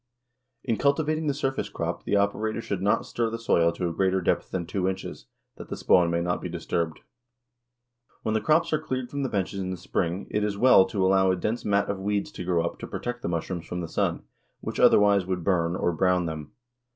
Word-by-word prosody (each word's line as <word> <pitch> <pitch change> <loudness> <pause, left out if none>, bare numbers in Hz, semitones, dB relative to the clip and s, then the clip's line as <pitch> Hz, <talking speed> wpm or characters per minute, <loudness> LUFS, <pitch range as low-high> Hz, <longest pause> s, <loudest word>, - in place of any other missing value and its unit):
In 115 -4 0
cultivating 155 +2 +1
the 145 - +2
surface 135 -2 -2
crop - - -4
the 100 - +1
operator 105 +2 0
should 100 -4 -3
not 100 +1 +2
stir 115 -1 -1
the 115 - -4
soil 85 -7 +2
to 90 +1 -2
a 85 - -3
greater 95 +1 +1
depth 90 - 0
than 90 -2 -3
two 95 +2 -1
inches, 95 - -6 0.3
that - - -10
the - - -4
spawn 85 -1 +4
may 85 0 0
not 90 +1 -1
be 90 - -4
disturbed. 85 -1 -3 1.2
When 110 - 0
the 110 - +1
crops 155 +8 +2
are 155 - +1
cleared 130 -5 -4
from 140 - -3
the 135 - -1
benches 100 -1 -2
in 95 -1 -3
the 95 - -3
spring 90 +1 -2
it 105 - 0
is 105 -1 -1
well 110 -4 +7
to 95 -1 -1
allow 95 0 +4
a 95 - +3
dense 105 +6 -2
mat 100 -1 +1
of 100 -1 -3
weeds 100 +1 -1
to - - -7
grow 85 -2 +1
up - - -4
to - - -6
protect 120 0 -5
the - - -3
mushrooms 85 0 -3
from 90 - -4
the 85 - -4
sun, - - -1 0.4
which, - - -5
otherwise, 100 -2 +5
would 90 -2 -2
"burn" 85 -2 +1
or 85 - +1
brown 90 +1 +2
them. 80 -3 -6
95 Hz, 225 wpm, -26 LUFS, 90-110 Hz, 1.2 s, well